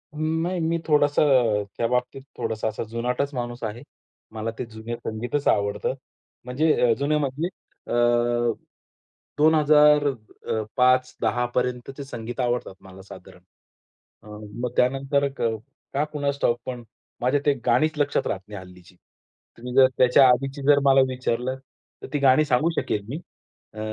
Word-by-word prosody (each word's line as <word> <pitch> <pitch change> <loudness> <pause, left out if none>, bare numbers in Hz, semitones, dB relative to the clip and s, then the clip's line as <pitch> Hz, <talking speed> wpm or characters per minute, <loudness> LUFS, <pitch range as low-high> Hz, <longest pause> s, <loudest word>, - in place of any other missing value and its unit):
नाही 160 +4 -1
मी 165 0 0
थोडंसं 145 -1 +3 0.4
अ, - - -4
त्या 115 - +1
बाबतीत 125 +2 -2 0.2
थोडासा 110 0 -2
असा 110 +1 -3
जुनाटच 125 +5 -2
माणूस 120 -1 -5
आहे. 110 +2 -5 0.5
मला 110 +1 -4
ते 125 - -2
जुने 115 +1 -7
संगीतच 120 +6 -3
आवडतं. 100 +2 +1 0.5
म्हणजे 145 +6 +1 0.2
अ, - - +5
जुने 145 +2 +1
म्हणजे 145 +3 -2 0.4
अ, - - -4 1.4
2000 150 -1 +5
अ, 110 -3 -4 0.2
5-10 130 -1 +2
पर्यंतचे 125 +2 -2
संगीत 120 -2 -7
आवडतात 120 -4 -1
मला 95 0 -13
साधारण. 95 - -13 0.8
अ, - - -16 0.4
मग 125 - 0
त्यानंतर 135 +2 +1
अ, 120 -5 -2 0.4
का 140 +2 +1
कुणास 140 -1 -2
ठाऊक, 120 0 +2
पण 125 -2 -6 0.4
माझ्या 130 +4 +2
ती 145 - +4
गाणीच 155 +6 +2
लक्षात 145 -1 0
राहत 95 - -3
नाही 105 -2 -8
हल्लीची. 90 -1 -15 0.6
तुम्ही 125 +1 -7
जर 135 -1 +7
त्याच्या 125 +1 +6
आधीची 135 +3 0
जर 145 -1 +6
मला 135 -1 +6
विचारलं, 130 0 -2 0.5
तर - - -6
ती 145 - 0
गाणी 140 +2 +4
सांगू 140 +4 +2
शकेल 105 -1 -3
मी. 145 +6 -4 0.5
अ, 110 - -10
130 Hz, 145 wpm, -24 LUFS, 115-145 Hz, 1.4 s, जर